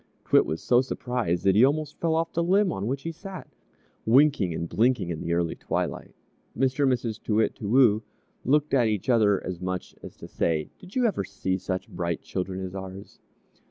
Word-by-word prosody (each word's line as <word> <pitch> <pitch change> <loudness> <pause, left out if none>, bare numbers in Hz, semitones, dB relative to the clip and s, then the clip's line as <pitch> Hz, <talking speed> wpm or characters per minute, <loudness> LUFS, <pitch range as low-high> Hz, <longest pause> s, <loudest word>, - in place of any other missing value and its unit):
_" - - -30
T'wit - - +5
was 80 - -4
so 125 0 +4
surprised 125 -8 -2
that 95 - +4
he 105 +5 +5
almost 150 +2 +1
fell 165 -1 +1
off 165 0 -1
the 170 - +1
limb 190 +2 +3
on 95 +2 -3
which 135 +2 -3
he 165 - -3
sat, 185 +2 -9 0.6
winking 130 - +4
and 85 +1 -3
blinking 110 -3 +1
in 80 - -4
the 85 - -3
early 85 -1 0
twilight. - - -4 0.4
Mr. 135 +2 +2
and 135 - +4
Mrs. 115 -3 -2
Too 105 - -1
Wit, 110 - +2
Too 100 - -6
Woo 115 -3 +5 0.4
looked 150 +3 +2
at 125 -4 +4
each 105 +2 -2
other 105 -5 +4
as 90 -1 -5
much 95 0 -4
as - - -10
to - - -11
say, 80 -2 -1
"Did 185 +1 -14
you 255 -1 +2
ever 205 - 0
see 95 0 -3
such 95 0 -4
bright 85 -2 -3
children 95 0 -4
as 90 - -7
ours?" 95 0 -9
110 Hz, 210 wpm, -26 LUFS, 95-140 Hz, 0.6 s, T'wit